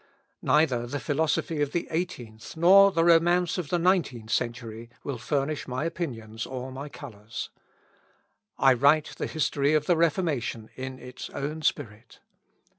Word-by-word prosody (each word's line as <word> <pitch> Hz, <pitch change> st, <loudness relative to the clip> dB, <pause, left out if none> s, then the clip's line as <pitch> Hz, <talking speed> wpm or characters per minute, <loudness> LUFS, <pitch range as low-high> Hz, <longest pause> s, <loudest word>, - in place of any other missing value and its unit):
Neither 130 Hz, -6 st, +2 dB
the 145 Hz, +4 st, -3 dB
philosophy 155 Hz, +1 st, 0 dB
of 145 Hz, -1 st, -1 dB
the 170 Hz, -, -1 dB
eighteenth, 130 Hz, -8 st, -5 dB
nor 195 Hz, +4 st, +7 dB
the 165 Hz, -2 st, +2 dB
romance 175 Hz, +1 st, +3 dB
of 160 Hz, -6 st, -4 dB
the 175 Hz, -, +1 dB
nineteenth 165 Hz, -, +1 dB
century, 115 Hz, -2 st, -3 dB
will 140 Hz, -4 st, -4 dB
furnish 145 Hz, +3 st, -2 dB
my 130 Hz, +4 st, -2 dB
opinions 115 Hz, -10 st, -5 dB
or 130 Hz, 0 st, -6 dB
my 140 Hz, +3 st, -7 dB
colours. 115 Hz, -6 st, -8 dB, 1.1 s
I 135 Hz, -1 st, +5 dB
write 145 Hz, +5 st, +3 dB
the -, -, -2 dB
history 145 Hz, -1 st, +1 dB
of 150 Hz, -1 st, +1 dB
the 175 Hz, -, +3 dB
Reformation 155 Hz, -9 st, 0 dB
in 130 Hz, 0 st, -6 dB
its 125 Hz, 0 st, -9 dB
own 150 Hz, +3 st, -4 dB
spirit. 115 Hz, -7 st, -3 dB
145 Hz, 145 wpm, -27 LUFS, 125-165 Hz, 1.1 s, nor